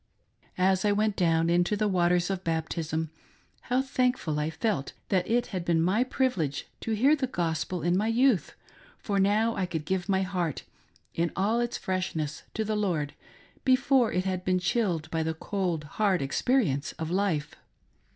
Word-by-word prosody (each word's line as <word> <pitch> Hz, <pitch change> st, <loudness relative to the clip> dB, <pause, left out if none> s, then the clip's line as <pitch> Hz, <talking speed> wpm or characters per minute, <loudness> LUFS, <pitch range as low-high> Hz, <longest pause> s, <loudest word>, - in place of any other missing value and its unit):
As 185 Hz, 0 st, +3 dB
I 210 Hz, -, +3 dB
went 210 Hz, 0 st, +1 dB
down 165 Hz, -2 st, +2 dB
into 175 Hz, +4 st, +2 dB
the 215 Hz, 0 st, +1 dB
waters 180 Hz, -1 st, +2 dB
of 190 Hz, -1 st, -3 dB
baptism, 160 Hz, -1 st, -2 dB, 0.6 s
how 255 Hz, +2 st, +2 dB
thankful 250 Hz, -, 0 dB
I 150 Hz, +1 st, 0 dB
felt 180 Hz, -, -2 dB, 0.2 s
that 185 Hz, -2 st, +1 dB
it 240 Hz, +1 st, +2 dB
had 185 Hz, -2 st, -2 dB
been 170 Hz, -1 st, +2 dB
my 190 Hz, +8 st, +3 dB
privilege 220 Hz, -, -1 dB
to 225 Hz, -, -2 dB
hear 265 Hz, +8 st, +4 dB
the 275 Hz, -3 st, -1 dB
gospel 170 Hz, -, -2 dB
in 175 Hz, +1 st, +2 dB
my 210 Hz, +4 st, +1 dB
youth, 235 Hz, -3 st, +2 dB, 0.4 s
for 200 Hz, -2 st, -1 dB
now 215 Hz, +4 st, +2 dB
I 185 Hz, -, -1 dB
could 160 Hz, -3 st, -4 dB
give 185 Hz, +2 st, -2 dB
my 190 Hz, -1 st, +2 dB
heart 180 Hz, -5 st, -2 dB, 0.5 s
in 170 Hz, 0 st, 0 dB
all 210 Hz, +5 st, +1 dB
its 240 Hz, 0 st, -1 dB
freshness 160 Hz, -5 st, -3 dB
to 220 Hz, -, -1 dB
the 215 Hz, 0 st, -1 dB
Lord, 170 Hz, -9 st, -1 dB, 0.5 s
before 260 Hz, -2 st, +3 dB
it 185 Hz, +1 st, 0 dB
had 185 Hz, -1 st, -2 dB
been 185 Hz, 0 st, +2 dB
chilled 180 Hz, -4 st, 0 dB
by 165 Hz, -, 0 dB
the 160 Hz, 0 st, -1 dB
cold, 175 Hz, -3 st, -2 dB
hard 185 Hz, +2 st, 0 dB
experience 145 Hz, -, +1 dB
of 160 Hz, -1 st, -5 dB
life. 175 Hz, -6 st, 0 dB
185 Hz, 170 wpm, -28 LUFS, 165-215 Hz, 0.6 s, hear